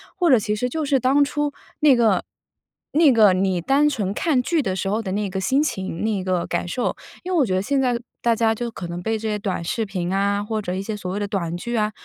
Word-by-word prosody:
或 355 -3 +2
者 255 - +7
其 210 0 -1
实 250 +4 -1
就 310 +4 -2
是 275 -2 +2
当 270 +4 +3
初 295 +1 -1 0.3
那 295 -3 +6
个 220 -6 +3 0.7
那 310 -2 +5
个 215 -5 +6
你 185 -1 +1
单 280 - +3
纯 205 -9 -2
看 290 +3 +1
剧 330 +4 +1
的 190 -8 -2
时 190 - -2
候 215 +2 0
的 195 -4 -4
那 205 0 -1
个 190 0 -4
心 270 +8 +2
情、 190 - -3
那 210 -3 0
个 185 -2 0
感 175 - -2
受。 240 +7 -1 0.3
因 370 +1 -3
为 345 - +3
我 - - +5
觉 190 -7 0
得 185 - +1
现 275 +5 +1
在 245 -2 +1 0.2
大 235 -1 +2
家 225 0 +2
就 235 +2 -4
可 210 -5 -7
能 170 +1 -5
被 220 +4 -1
这 220 +1 -4
些 210 -1 -1
短 195 -4 -3
视 225 +7 -1
频 185 -2 -3
啊， 200 +1 +1
或 215 0 -2
者 180 -2 -3
一 190 - -3
些 215 +1 -4
所 185 -3 -5
谓 200 - -2
的 205 - -2
短 175 -5 -2
剧 235 +7 -4
啊 215 -1 +1
215 Hz, 290 characters per minute, -22 LUFS, 190-260 Hz, 0.7 s, 者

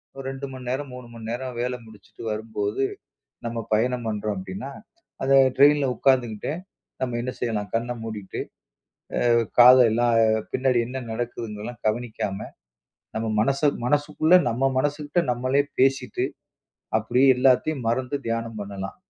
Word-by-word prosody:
ஒரு 135 - -7
2 135 +1 -6
மணி 130 -1 -9
நேரம், 135 +1 -3
3 125 -1 -9
மணி 115 -1 -8
நேரம் 125 0 -4
வேல 125 +1 -1
முடிச்சிட்டு 110 0 -14
வரும்போது, 110 +2 -2 0.6
நம்ம 115 0 -3 0.2
பயணம் 120 +2 +1
பண்றோம் 105 -1 -2
அப்டின்னா, 95 +9 -6 0.5
அந்த 135 +1 +3 0.2
ட்ரைனில்ல 145 0 +6
உக்காந்துகிட்டே, 120 -1 +1 0.5
நம்ம 125 -2 -1
என்ன 125 +1 -3
செய்யலாம், 105 -4 -2
கண்ண 120 +2 -1
மூடிட்டு, 105 -4 -6 0.9
அ - - +4 0.3
காதெல்லாம், 120 -1 +7 0.4
பின்னாடி 130 -2 +2
என்ன 130 +1 -5
நடக்குதுங்கெல்லாம் 115 0 -5
கவனிக்காம, 110 -3 -2 0.8
நம்ம 110 +1 -1
மனச 135 +5 +1 0.3
மனசுக்குள்ள, 145 +4 +2 0.2
நம்ம 135 +4 +1
மனசுக்கிட்ட 145 +4 0
நம்மளே 130 +3 +1 0.2
பேசிட்டு, 135 +1 +2 0.7
அப்டேயே 125 +5 +3
எல்லாத்தயும் 130 +2 +2
மறந்து 125 +4 0
தியானம் 115 -1 -3
பண்ணலாம். 100 -1 -6
120 Hz, 125 wpm, -24 LUFS, 110-130 Hz, 0.9 s, காதெல்லாம்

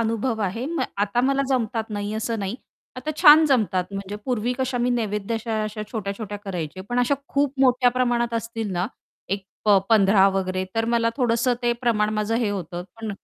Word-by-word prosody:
अनुभव 225 0 -1
आहे. 205 +6 -2
म 335 +1 -2 0.2
आता 205 +4 +1
मला 275 +2 +2
जमतात 230 -4 0
नाही, 205 0 -3
असं 225 +1 -2
नाही. 195 +2 -3 0.4
आता 255 +5 -4
छान 310 -1 +8
जमतात 210 -9 +2
म्हणजे 195 +1 -5
पूर्वी 245 -1 0
कशा 260 -1 -1
मी 245 +1 +1
नैवेद्य 215 -2 -1
अशा 220 -1 -2
अशा 215 0 -4
छोट्या-छोट्या 205 -1 -4
करायचे 185 -4 -5
पण 245 0 -1
अशा 245 +3 +3
खूप 280 -1 +1
मोठ्या 250 -1 +4
प्रमाणात 240 -2 0
असतील 225 -2 -3
ना, 180 +1 0 0.4
एक 195 0 -2 0.2
प 205 -2 +6
15 195 -3 +5
वगैरे 185 -1 -1
तर 225 0 +1
मला 230 -1 +2
थोडंसं 245 -1 +2
ते 240 - +2
प्रमाण 215 -3 +1
माझं 215 +1 0
हे 230 -3 0
होतं. 180 -3 -4 0.2
पण 220 -1 -4
225 Hz, 185 wpm, -23 LUFS, 205-245 Hz, 0.4 s, छान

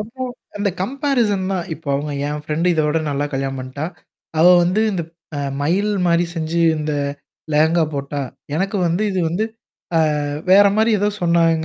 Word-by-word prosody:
அப்போ 230 +5 -7 0.3
அந்த 205 0 0
so - - -18
comparison 235 -6 0
தான் 180 -3 -2
இப்போ 155 -2 -11
அவங்க 145 +1 -2
என் 150 0 -3
ஃப்ரெண்ட் 155 +3 -1
இதோட 155 -1 +1
நல்லா 145 0 -1
கல்யாணம் 135 0 -2
பண்ணிட்டா? 130 +4 -5 0.5
அவ 170 - +6 0.2
வந்து 185 +5 +2
இந்த 175 - -1 0.3
அ 145 - -2 0.2
மயல் 200 +7 +1
மாரி 170 0 +3
செஞ்சு 165 +1 -1 0.2
இந்த 150 0 -2 0.6
லேகங்கா 160 +2 +4
போட்டா 140 +1 -3 0.3
எனக்கு 195 +5 -1
வந்து 170 +5 0
இது 190 -2 0
வந்து 180 +7 0 0.5
அ - - +5 0.5
வேற 200 +2 +8
மாரி 220 +1 +3
ஏதோ 205 - +2
சொன்னாங்க. 165 -2 +3
170 Hz, 165 wpm, -20 LUFS, 150-195 Hz, 0.6 s, வேற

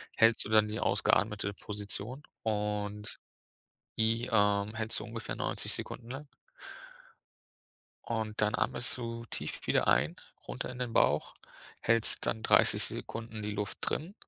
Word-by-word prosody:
hältst 115 0 +5
du - - -6
dann 110 -1 +5
die 105 +1 -3
ausgeatmete 105 -1 +2
Position, 105 +7 -3 0.2
und 105 -1 -2 0.8
die, 115 +2 +3
ähm, 105 -1 +3
hältst 110 0 +1
du - - -6
ungefähr 115 +1 -4
90 - - 0
Sekunden 115 - -5
lang. 140 +3 -7 1.8
Und 110 -2 -2
dann 105 0 +2
atmest 120 +2 +1
du 115 -1 -5
tief - - -4
wieder - - +2
ein, 75 +7 +3 0.3
runter - - -5
in 125 - -8
den 125 -2 -3
Bauch, 75 +1 +3 0.5
hältst 115 0 +2
dann 110 - -1
30 - - +5
Sekunden 110 -1 -4
die 105 - -3
Luft 105 0 -3
drin. 165 +6 -2
110 Hz, 140 wpm, -31 LUFS, 105-115 Hz, 1.8 s, hältst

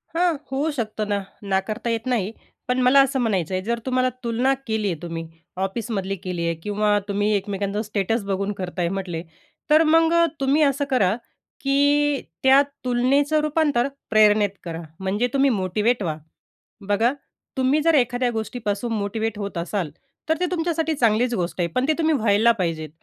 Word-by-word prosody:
हां, 345 -1 +2 0.2
होऊ 280 +4 0
शकतो 220 -6 -3
ना, 205 -1 0 0.3
नाकारता 200 +4 -1
येत 230 -1 -2
नाही. 220 -5 0 0.4
पण 250 +1 +1
मला 255 +2 +6
असं 270 0 +1
म्हणायचं 195 -8 0
आहे 185 - 0
जर 235 +3 -1
तुम्हाला 255 -1 +1
तुलना 240 +3 +1
केली 220 -2 0
आहे 165 - -6
तुम्ही 165 -1 -5 0.4
ऑफिसमधली 195 -2 -3
केली 180 -3 -3
आहे 170 0 0
किंवा 210 0 +1
तुम्ही 205 +1 0
एकमेकांचं 200 +1 -2
स्टेटस 215 +1 -1
बघून 200 +1 -1
करत 180 -1 -5
आहे 170 -1 +1
म्हटले, 180 -3 -4 0.5
तर 310 +2 +6
मग 325 +1 +4
अ, 335 0 +5
तुम्ही 275 +3 +2
असं 285 0 +1
करा, 210 -7 +2 0.5
की 285 +1 +2 0.2
त्या 265 +1 +7 0.2
तुलनेचं 275 +5 +2
रूपांतर 300 -4 +1 0.2
प्रेरणेत 210 -1 +5
करा. 165 -1 -5 0.2
म्हणजे 195 +5 0
तुम्ही 275 0 +4
मोटिवेट 210 +2 0
व्हा. 155 -4 -2 0.7
बघा, 220 +5 +2 0.4
तुम्ही 265 +4 +2
जर 330 +1 +3
एखाद्या 250 -1 +2
गोष्टीपासून 220 0 -3
मोटिव्हेट 220 +1 -2
होत 200 -3 -4
असाल, 170 -1 -2 0.4
तर 320 - +2
ते 360 - +1
तुमच्यासाठी 325 -2 0
चांगलीच 240 -1 +2
गोष्ट 180 -4 -2
आहे. 170 - +1
पण 255 +2 +1
ते 315 - +3
तुम्ही 320 -1 +2
व्हायला 220 -1 +4
पाहिजेत. 165 -7 -2
225 Hz, 165 wpm, -23 LUFS, 200-270 Hz, 0.7 s, त्या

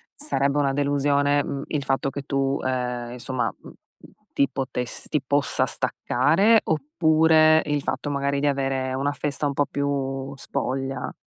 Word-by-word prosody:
sarebbe 140 - 0
una 140 -2 +2
delusione, 145 0 +2
mhmm, 140 - -4
il 145 -2 -2
fatto 135 0 0
che 140 0 -6
tu, 135 0 0
ehm, 125 -2 -2
insomma, 125 +1 -3 0.2
mhmm, - - -12
mhmm, - - -22 0.2
ti 140 - +2
potess 125 -2 -4
ti 150 - 0
possa 140 +1 +1
staccare, 215 +7 +2
oppure 155 +1 +4
il 145 -1 -1
fatto 145 - -3
magari 140 0 0
di 145 - +1
avere 135 -2 -1
una 140 +2 0
festa 145 0 -3
un 140 - 0
po' 145 0 +1
più 135 -1 -2
spoglia? 135 -1 -3
140 Hz, 155 wpm, -24 LUFS, 135-145 Hz, 0.2 s, oppure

